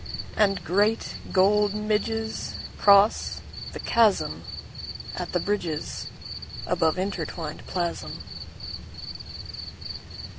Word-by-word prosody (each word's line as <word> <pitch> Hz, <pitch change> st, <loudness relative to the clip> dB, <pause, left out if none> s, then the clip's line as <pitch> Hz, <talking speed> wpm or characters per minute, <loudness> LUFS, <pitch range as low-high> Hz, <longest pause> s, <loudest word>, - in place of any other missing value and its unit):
And 195 Hz, -4 st, +3 dB
great 205 Hz, +6 st, +2 dB, 0.2 s
gold 205 Hz, +2 st, +5 dB
midgesCross 210 Hz, -1 st, +3 dB, 0.3 s
the -, -, -5 dB
chasmAt 225 Hz, -4 st, 0 dB
the -, -, +2 dB
bridgesAbove 170 Hz, -2 st, -1 dB
intertwined 170 Hz, -4 st, -2 dB
plasm. 175 Hz, -2 st, -2 dB
200 Hz, 60 wpm, -27 LUFS, 180-210 Hz, 0.3 s, gold